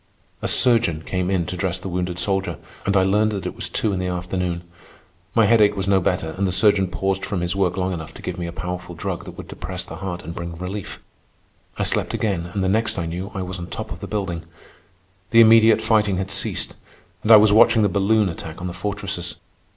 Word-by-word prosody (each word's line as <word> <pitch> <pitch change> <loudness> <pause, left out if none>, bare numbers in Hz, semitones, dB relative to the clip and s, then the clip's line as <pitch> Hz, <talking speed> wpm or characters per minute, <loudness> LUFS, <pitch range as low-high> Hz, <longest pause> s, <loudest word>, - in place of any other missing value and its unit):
A - - -1
surgeon 115 -11 +3
came 90 +1 -2
in 95 -3 +1
to 90 - -4
dress 90 0 -1
the - - -8
wounded 90 -1 -2
soldier, 95 -3 0 0.3
and 100 0 +3
I 95 - +4
learned 105 +3 +2
that 95 -3 -4
it 90 - -4
was - - -1
two 105 - 0
in 95 - -2
the 90 - -2
afternoon. 90 -1 -3 0.7
My 115 - +5
headache 105 -2 +4
was 95 0 -1
no 95 -1 +3
better, 90 -3 -1
and 100 - +2
the - - -1
surgeon 100 0 +4
paused 95 +2 -2
from 95 -4 -2
his 90 +1 -1
work 95 -2 +1
long 95 0 0
enough 80 -3 -6
to - - -11
give 90 0 -4
me 85 - -3
a - - -5
powerful 90 0 -6
drug - - -4
that - - -10
would - - -8
depress - - -6
the - - -9
heart 90 -2 -5
and 85 - -6
bring 85 0 -6
relief. 90 +3 -6 0.7
I - - 0
slept - - 0
again, 95 -6 -1
and 95 +1 -2
the - - +1
next 110 +3 +1
I 85 - -1
knew 90 +4 -4
I 95 - -2
was 90 0 -5
on 85 - -6
top - - -6
of - - -6
the - - -7
building. 95 -6 -3 0.9
The 115 - +5
immediate 110 -1 +6
fighting 105 -3 +2
had 95 +1 -3
ceased, - - -1 0.4
and 110 - +2
I 110 - +12
was 105 0 +5
watching 110 0 +6
the - - +4
balloon 100 +2 +2
attack 80 -2 -6
on 90 - -6
the 90 - -4
fortresses. 100 -1 -3
95 Hz, 235 wpm, -22 LUFS, 90-105 Hz, 0.9 s, I